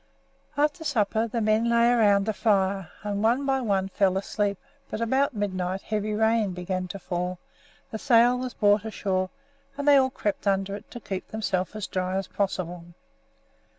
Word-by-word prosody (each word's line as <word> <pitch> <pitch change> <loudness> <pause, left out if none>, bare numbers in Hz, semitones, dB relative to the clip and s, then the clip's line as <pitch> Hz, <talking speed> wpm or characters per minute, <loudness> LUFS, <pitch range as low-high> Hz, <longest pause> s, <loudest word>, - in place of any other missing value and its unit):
After 300 +2 +1
supper 225 -5 +1
the 230 +1 -2
men 215 +2 +2
lay 235 0 +4
around 205 -4 +4
the 220 - 0
fire, 195 -4 +1
and 205 -1 -2
one 240 +5 +2
by 270 -1 +1
one 195 -5 0
fell 190 -1 +2
asleep; 200 0 -1 0.3
but - - -4
about 260 +3 +1
midnight 190 -2 -2
heavy 215 0 -2
rain 220 -2 +2
began 185 +1 -3
to 190 - -6
fall, 180 -1 -3 0.5
the 220 - -4
sail 245 -1 +4
was 255 -2 -5
brought 205 0 +3
ashore, 190 -4 -2 0.5
and 285 0 -3
they 285 -1 +8
all 260 -1 +4
crept 205 -5 -3
under 195 0 +1
it 210 +2 -11
to 240 - -8
keep 190 -4 -5
themselves 195 -3 -2
as 215 -2 -3
dry 185 0 -2
as 195 0 -2
possible. 180 -3 -3
210 Hz, 175 wpm, -26 LUFS, 190-230 Hz, 0.5 s, they